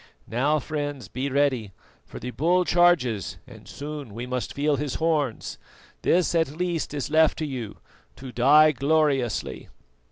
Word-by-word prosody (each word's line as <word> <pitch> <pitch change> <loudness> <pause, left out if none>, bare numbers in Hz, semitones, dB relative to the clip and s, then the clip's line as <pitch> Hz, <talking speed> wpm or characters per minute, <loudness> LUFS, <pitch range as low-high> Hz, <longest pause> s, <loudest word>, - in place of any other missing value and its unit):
Now, 140 +7 +1
friends, 145 -2 -4
be 135 +2 -3
ready, 130 -7 0 0.3
for - - -10
the 125 - -5
bull 175 +7 +2
charges 165 - +2
and - - -14
soon 145 -6 -7
we 120 +2 -5
must 125 -1 -3
feel 145 0 +1
his 145 -2 -3
horns. 155 -7 -1 0.4
This 175 0 +2
at 165 -1 +2
least 170 -4 -2
is 145 0 -3
left 160 0 +4
to 155 - -2
you, 125 -7 -6 0.4
to 125 +1 -9
die 150 +6 +6
gloriously." 135 - 0
145 Hz, 150 wpm, -25 LUFS, 125-155 Hz, 0.4 s, die